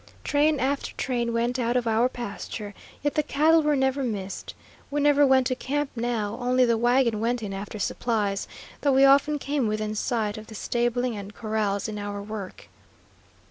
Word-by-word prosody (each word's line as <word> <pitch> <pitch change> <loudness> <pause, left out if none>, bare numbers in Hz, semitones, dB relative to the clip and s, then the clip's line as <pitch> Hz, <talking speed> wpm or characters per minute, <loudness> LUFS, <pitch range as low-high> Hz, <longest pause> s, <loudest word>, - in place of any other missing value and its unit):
Train 295 0 +2
after 275 +2 -1
train 240 -2 -1
went 240 +2 0
out 240 +1 +1
of 245 - 0
our 230 +2 +2
pasture, 210 -3 -6 0.3
yet 290 - +1
the 305 - +2
cattle 310 +3 +3
were 300 -1 +2
never 265 0 +1
missed. 200 -6 -4 0.3
We 290 - -1
never 290 0 +5
went 265 -1 +4
to 255 - 0
camp 285 +2 -2
now; 230 -2 -2
only 250 +1 +3
the 235 -1 +3
wagon 240 -1 +2
went 235 +1 -1
in 200 -2 -4
after 200 +2 -6
supplies, 205 -1 -1 0.3
though 285 -2 +3
we 270 +1 +6
often 280 +2 +5
came 280 -3 -1
within 215 0 -2
sight 215 -1 -1
of 215 - -12
the 220 - -10
stabling 240 +2 -1
and 200 0 -8
corrals 215 -2 -1
in 210 -1 -5
our 205 0 -4
work. 200 -2 -7
240 Hz, 180 wpm, -26 LUFS, 215-270 Hz, 0.3 s, we